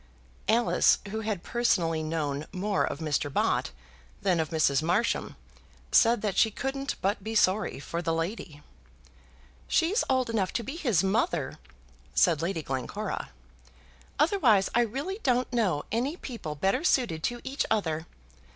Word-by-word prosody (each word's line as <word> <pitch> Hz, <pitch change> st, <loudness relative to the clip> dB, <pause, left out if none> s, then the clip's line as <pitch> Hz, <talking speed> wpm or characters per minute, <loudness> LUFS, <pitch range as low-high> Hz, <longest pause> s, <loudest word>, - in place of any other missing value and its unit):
Alice, 230 Hz, +2 st, +4 dB
who 220 Hz, -, -2 dB
had 215 Hz, -5 st, -3 dB
personally 170 Hz, -9 st, +1 dB
known 155 Hz, -2 st, -2 dB
more 200 Hz, +2 st, 0 dB
of -, -, -2 dB
Mr. 150 Hz, -2 st, -1 dB
Bott -, -, +1 dB, 0.5 s
than 185 Hz, -4 st, +2 dB
of 160 Hz, -, -1 dB
Mrs. 155 Hz, -3 st, +2 dB
Marsham, 180 Hz, +9 st, 0 dB, 0.6 s
said 230 Hz, -2 st, +5 dB
that 205 Hz, -3 st, -1 dB
she 220 Hz, -, +5 dB
couldn't 270 Hz, +5 st, -3 dB
but 200 Hz, 0 st, 0 dB
be 220 Hz, +1 st, -4 dB
sorry 195 Hz, -5 st, +2 dB
for 170 Hz, +5 st, -4 dB
the 165 Hz, -1 st, -1 dB
lady. 165 Hz, -3 st, -4 dB, 1.0 s
"She's 370 Hz, +8 st, +2 dB
old 260 Hz, -1 st, +2 dB
enough 215 Hz, -5 st, -1 dB
to 235 Hz, -, -1 dB
be 270 Hz, +7 st, -6 dB
his 240 Hz, -, +1 dB
mother," 220 Hz, -, 0 dB, 0.6 s
said 165 Hz, -4 st, +4 dB
Lady 165 Hz, -1 st, -2 dB
Glencora, 135 Hz, -, -4 dB, 0.9 s
"otherwise 275 Hz, -, +3 dB
I 240 Hz, -, +4 dB
really 275 Hz, -, -3 dB
don't 250 Hz, -1 st, +1 dB
know 190 Hz, -11 st, +1 dB
any 255 Hz, -, -1 dB
people 230 Hz, -, -6 dB
better 195 Hz, -, +1 dB
suited 240 Hz, -, +1 dB
to 240 Hz, 0 st, -2 dB
each 275 Hz, +2 st, -1 dB
other. 165 Hz, -7 st, -1 dB
205 Hz, 145 wpm, -28 LUFS, 165-240 Hz, 1.0 s, said